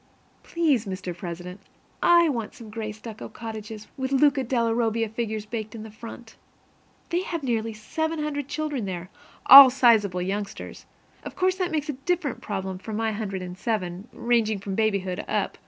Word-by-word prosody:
Please, 295 Hz, -10 st, +1 dB
Mr. 185 Hz, -2 st, -5 dB
President, 175 Hz, +2 st, -7 dB, 0.4 s
I 340 Hz, -1 st, +6 dB
want 235 Hz, -8 st, -3 dB
some 220 Hz, -3 st, -11 dB
gray 215 Hz, -1 st, -4 dB
stucco 220 Hz, +1 st, -9 dB
cottages, 220 Hz, -1 st, -8 dB
with 265 Hz, 0 st, -3 dB
Luca 275 Hz, 0 st, +4 dB
della 235 Hz, -2 st, +1 dB
Robbia 225 Hz, -1 st, +1 dB
figures 220 Hz, -1 st, -4 dB
baked 220 Hz, 0 st, -5 dB
into 220 Hz, -1 st, -7 dB
the -, -, -22 dB
front. 230 Hz, 0 st, -10 dB, 0.7 s
They 345 Hz, +1 st, 0 dB
have 335 Hz, -4 st, -4 dB
nearly 225 Hz, -3 st, -1 dB
700 300 Hz, +5 st, -3 dB
children 290 Hz, -6 st, -3 dB
there, 185 Hz, -2 st, -3 dB
and 180 Hz, -, -13 dB, 0.4 s
all 275 Hz, -1 st, +12 dB
sizable 220 Hz, -8 st, +3 dB
youngsters. 200 Hz, +2 st, -5 dB, 0.4 s
Of -, -, -8 dB
course 370 Hz, 0 st, +1 dB
that 365 Hz, -2 st, 0 dB
makes 305 Hz, -2 st, -2 dB
a -, -, 0 dB
very 265 Hz, -, -15 dB
different 350 Hz, -7 st, 0 dB
problem 190 Hz, -3 st, -4 dB
from 215 Hz, +2 st, -6 dB
my 225 Hz, 0 st, 0 dB
hundred 200 Hz, -3 st, -4 dB
and 180 Hz, 0 st, -7 dB
seven, 190 Hz, -2 st, -3 dB
ranging 230 Hz, -3 st, +1 dB
from 195 Hz, 0 st, -5 dB
babyhood 200 Hz, -3 st, 0 dB
up. -, -, -2 dB
225 Hz, 170 wpm, -25 LUFS, 205-270 Hz, 0.7 s, all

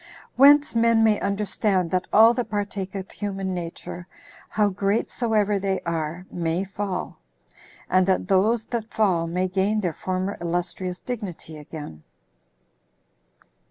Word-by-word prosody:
Whence 285 Hz, +2 st, +6 dB
men 230 Hz, -1 st, +4 dB
may 215 Hz, -2 st, +4 dB
understand 200 Hz, -2 st, 0 dB
that 185 Hz, -1 st, 0 dB
all 225 Hz, +2 st, +7 dB
that 245 Hz, -1 st, -3 dB
partake 200 Hz, -2 st, -3 dB
of 190 Hz, -1 st, -6 dB
human 195 Hz, -2 st, -3 dB
nature, 175 Hz, 0 st, -6 dB, 0.4 s
how 210 Hz, -1 st, +2 dB
great 200 Hz, +3 st, 0 dB
soever 210 Hz, -4 st, +1 dB
they 195 Hz, -1 st, -1 dB
are, 170 Hz, +1 st, -3 dB
may 170 Hz, +1 st, -1 dB
fall; 195 Hz, -, -4 dB, 0.7 s
and 185 Hz, 0 st, +3 dB
that 190 Hz, -1 st, +1 dB
those 215 Hz, +4 st, +2 dB
that 230 Hz, -2 st, -4 dB
fall 185 Hz, -7 st, +1 dB
may 180 Hz, +2 st, 0 dB
gain 195 Hz, +3 st, +1 dB
their 175 Hz, -4 st, -1 dB
former 185 Hz, +3 st, -3 dB
illustrious 175 Hz, +1 st, -2 dB
dignity 200 Hz, -10 st, -6 dB
again. 150 Hz, -, -9 dB
195 Hz, 130 wpm, -24 LUFS, 180-210 Hz, 0.7 s, all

